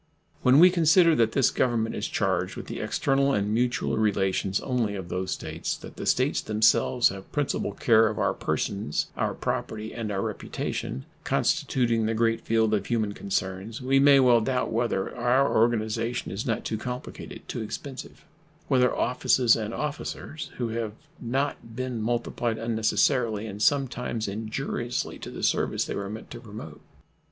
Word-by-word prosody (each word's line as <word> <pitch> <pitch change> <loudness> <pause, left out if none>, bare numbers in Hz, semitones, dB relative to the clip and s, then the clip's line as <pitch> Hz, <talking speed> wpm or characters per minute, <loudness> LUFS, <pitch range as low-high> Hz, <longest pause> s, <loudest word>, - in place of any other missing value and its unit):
When 130 +2 +5
we 180 +4 +8
consider 170 0 +5
that 115 -1 +2
this 135 -3 +3
Government 115 -3 0
is - - -3
charged - - -1
with - - -7
the - - -6
external 140 0 +1
and 105 +1 0
mutual 120 +2 0
relations 95 -2 +1
only 120 -6 -1
of 95 -3 -6
these 95 +1 -3
States; - - -3
that - - -11
the - - -5
States - - +2
themselves 110 +3 +3
have 95 0 -9
principal 140 -8 -1
care 110 +1 +4
of 105 - -3
our - - +1
persons, 100 -7 -2
our - - -1
property, 110 0 -3
and 110 -3 -4
our 100 -1 -1
reputation, 65 - -4 0.2
constituting 115 -4 +1
the 115 - 0
great 115 0 +1
field 110 -1 +1
of 105 - 0
human 110 -4 0
concerns, 95 +2 -3
we 135 +1 +2
may 140 0 +7
well 125 -3 +5
doubt 125 0 -1
whether 115 -4 -1
our 125 +3 +2
organization 115 +1 +1
is 100 +6 -4
not 115 - -1
too 110 - -2
complicated, 125 +1 -7
too 120 - -4
expensive; 130 +5 -7 0.4
whether 125 -3 +3
offices 125 -1 +3
and 110 -1 -3
officers 150 +2 -5
have 115 -3 -2 0.3
not 125 -2 -2
been 130 -2 -3
multiplied 120 0 -1
unnecessarily 110 0 +1
and 105 -1 -7
sometimes 125 -5 0
injuriously 115 +4 -3
to - - -7
the - - -7
service - - +1
they - - -4
were 100 -1 -4
meant 110 +2 -8
to - - -7
promote. - - -10
115 Hz, 160 wpm, -26 LUFS, 110-125 Hz, 0.4 s, we